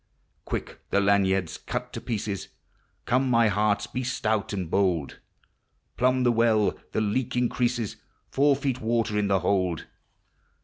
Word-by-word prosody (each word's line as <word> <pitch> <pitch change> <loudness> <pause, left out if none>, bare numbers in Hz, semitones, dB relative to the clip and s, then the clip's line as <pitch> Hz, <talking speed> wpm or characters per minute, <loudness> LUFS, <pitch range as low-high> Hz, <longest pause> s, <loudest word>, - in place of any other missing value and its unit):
Quick - - -4
the 100 - +2
lanyards 95 -4 +2
cut - - -5
to - - -5
pieces; 105 -3 -3 0.6
Come, 130 +2 +2
my 115 -2 +4
hearts, 105 0 +1
be 130 - -4
stout 110 -4 -1
ami 100 -3 -2
bold; 85 -5 0 0.8
riumb 130 +1 +3
the 120 - +4
well,— 115 -2 +3 0.2
the - - 0
leak 115 +4 -1
increases, 120 -2 0 0.3
Four 140 +1 +4
feet 135 -2 -2
water 115 -1 0
iu 105 -1 +1
the 95 -2 +2
hold! 90 -2 0
110 Hz, 140 wpm, -26 LUFS, 100-125 Hz, 0.8 s, my